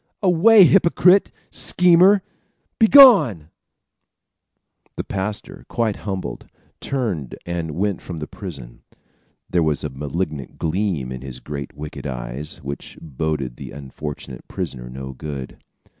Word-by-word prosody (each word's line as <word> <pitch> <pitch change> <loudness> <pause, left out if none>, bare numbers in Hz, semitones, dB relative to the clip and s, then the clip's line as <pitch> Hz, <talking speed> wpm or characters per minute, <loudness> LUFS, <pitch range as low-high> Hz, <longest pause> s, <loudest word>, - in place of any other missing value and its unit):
Away, 195 +4 +7
hypocrite! 180 +1 +4 0.2
Schemer, 180 +3 +4 0.6
begone!" 200 - +7 1.4
The - - -3
pastor, 100 +2 -5
quite 115 -3 -1
humbled, 95 -3 -5 0.3
turned 105 - -3
and 85 -3 -4
went 100 0 -1
from 85 - -7
the 75 - -5
prison. 70 - -10 0.7
There 90 - +1
was 75 -3 0
a 75 - -3
malignant 75 +1 -4
gleam 80 -6 -2
in 65 -1 -6
his 65 -2 -8
great 70 -1 -7
wicked 75 0 -7
eyes, 65 +4 -6
which 70 +1 -7
boded 75 -4 -3
the - - -8
unfortunate 70 +1 -8
prisoner - - -6
no 65 +1 -7
good. 70 -1 -7
80 Hz, 115 wpm, -21 LUFS, 70-110 Hz, 1.4 s, Away